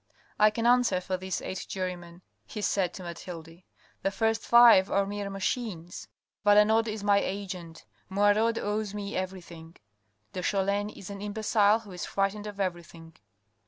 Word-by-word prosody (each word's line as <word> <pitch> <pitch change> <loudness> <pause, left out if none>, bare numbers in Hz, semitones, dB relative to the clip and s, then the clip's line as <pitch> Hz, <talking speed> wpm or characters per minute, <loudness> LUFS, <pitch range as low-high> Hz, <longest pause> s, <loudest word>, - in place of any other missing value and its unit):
I 215 - +7
can 225 +2 -3
answer 240 -6 +4
for 185 +1 -3
these 185 0 -4
eight 190 - -5
jurymen 180 -2 -5 0.2
he 210 - -6
said 190 -3 +1
to 185 - -8
Mathilde. 170 -1 -9 0.4
The - - +1
first 225 +2 0
five 235 -5 +7
are 200 0 +2
mere 205 0 -4
machines, 195 -3 -4 0.4
Valenod 210 +2 +5
is 215 -1 -4
my 200 -1 +4
agent: 185 -5 -6 0.2
Moirod 205 +4 +2
owes 210 0 -2
me 205 0 -5
everything: 175 -3 -6 0.6
de 185 - -4
Cholin 200 +2 0
is 200 -1 -10
an 200 0 -7
imbecile 210 +1 +2
who 210 -3 -13
is 180 -1 -6
frightened 200 +2 -1
of 205 -1 -8
everything. 170 -3 -5
200 Hz, 155 wpm, -28 LUFS, 180-210 Hz, 0.6 s, I